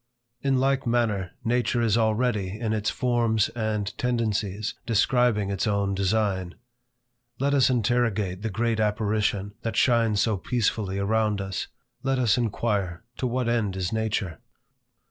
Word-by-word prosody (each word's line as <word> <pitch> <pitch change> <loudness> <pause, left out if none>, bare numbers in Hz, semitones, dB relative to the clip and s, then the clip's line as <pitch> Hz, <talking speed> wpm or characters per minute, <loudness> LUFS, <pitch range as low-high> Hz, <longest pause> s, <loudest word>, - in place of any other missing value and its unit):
In 135 -1 +2
like 135 0 +1
manner, 110 -6 0
nature 120 +1 +1
is 115 -3 +2
already, 110 -3 0
in 110 -2 -1
its 105 -1 0
forms 120 -4 +1
and 110 -3 -2
tendencies, 110 -4 -1
describing 115 -2 +2
its 100 +3 -1
own 100 -1 +1
design. 95 -2 0 0.8
Let 140 +2 +1
us 135 -3 +4
interrogate 110 -6 0
the 110 - -2
great 115 +2 0
apparition, 105 -1 0
that 115 -2 -3
shines 115 -3 +3
so 110 -1 +2
peacefully 105 -1 -1
around 105 +1 +1
us. 95 -1 -3 0.3
Let 135 0 0
us 120 -4 +3
inquire, 105 -7 -1
to 130 - -1
what 125 0 -1
end 115 -5 0
is 95 +1 -2
nature? 110 -7 -2
110 Hz, 140 wpm, -26 LUFS, 100-120 Hz, 0.8 s, us